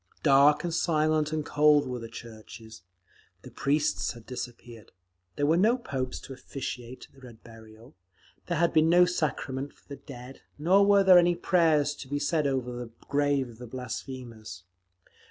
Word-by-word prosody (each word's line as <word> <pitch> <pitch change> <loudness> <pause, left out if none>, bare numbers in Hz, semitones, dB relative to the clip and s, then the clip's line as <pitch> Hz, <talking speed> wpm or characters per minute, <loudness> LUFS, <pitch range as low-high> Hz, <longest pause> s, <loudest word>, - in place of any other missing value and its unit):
Dark 145 +2 +5
and 170 -1 -3
silent 155 -2 +1
and 155 -1 -2
cold 150 0 +4
were 125 -1 -4
the 115 -1 -8
churches; 110 -2 -12 0.6
the - - -12
priests 145 +2 0
had 120 -2 -14
disappeared. 120 -3 -9 0.4
There 145 - 0
were 160 +3 +3
no 220 +7 +3
popes 130 - -4
to 135 - -9
officiate 130 -2 -7
at - - -33
the 135 - -19
Red 120 -4 -14
Burial, 115 0 -15 0.5
there 175 - -1
had 170 +1 +2
been 160 0 +4
no 175 +1 +6
sacrament 145 -5 -3
for - - -30
the 140 - -8
dead, 130 -1 -12 0.2
nor 180 +7 +4
were 195 -3 +7
any 175 0 +3
prayers 160 -5 +2
to 135 - -9
be 145 +2 -2
said 145 +1 0
over 130 -2 -2
the 120 -1 -7 0.2
grave 145 -2 +1
of 115 -2 -14
the 125 - -9
blasphemers. 120 -6 -8
140 Hz, 170 wpm, -27 LUFS, 125-155 Hz, 0.6 s, were